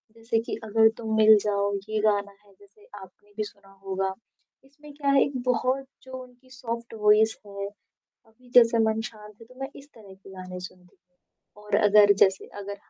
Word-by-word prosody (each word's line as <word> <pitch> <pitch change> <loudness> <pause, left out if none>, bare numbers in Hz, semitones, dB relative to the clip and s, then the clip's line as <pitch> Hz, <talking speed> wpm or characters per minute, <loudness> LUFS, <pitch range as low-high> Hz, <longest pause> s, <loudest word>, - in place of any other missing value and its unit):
जैसे 225 0 -1
कि - - -3
"अगर 220 +1 +4
तुम 220 -2 -3
मिल 220 0 +7
जाओ" 200 -1 0 0.2
ये 215 0 -1
गाना 205 -1 +1
है, 200 - -22
जैसे 205 +1 -22
आपने 205 +1 -15
भी 215 - -1
सुना 200 -1 -13
होगा, 190 0 -2 0.5
इसमें 295 +2 -16
क्या 285 -1 -2
है 275 - +5
एक 275 - -3
बहुत 255 +2 0 0.2
जो 260 - -13
उनकी 250 +1 -20
सॉफ्ट 235 -2 -6
वॉइस 215 +1 +4
है 200 0 -6 0.6
अभी 245 +3 -23
जैसे 235 -1 +6
मन 220 0 0
शांत 210 -1 -14
है - - -12
तो 255 - -19
मैं 270 - -4
इस 280 +1 -17
तरह 205 -4 -14
के 195 +1 -17
गाने 185 -1 -8
सुनती 180 0 -12 0.2
हूँ 205 +3 -24
और 210 - -1
अगर 205 0 +6
जैसे 190 -1 0 0.2
अगर 200 +1 -6
215 Hz, 190 wpm, -25 LUFS, 200-235 Hz, 0.6 s, मिल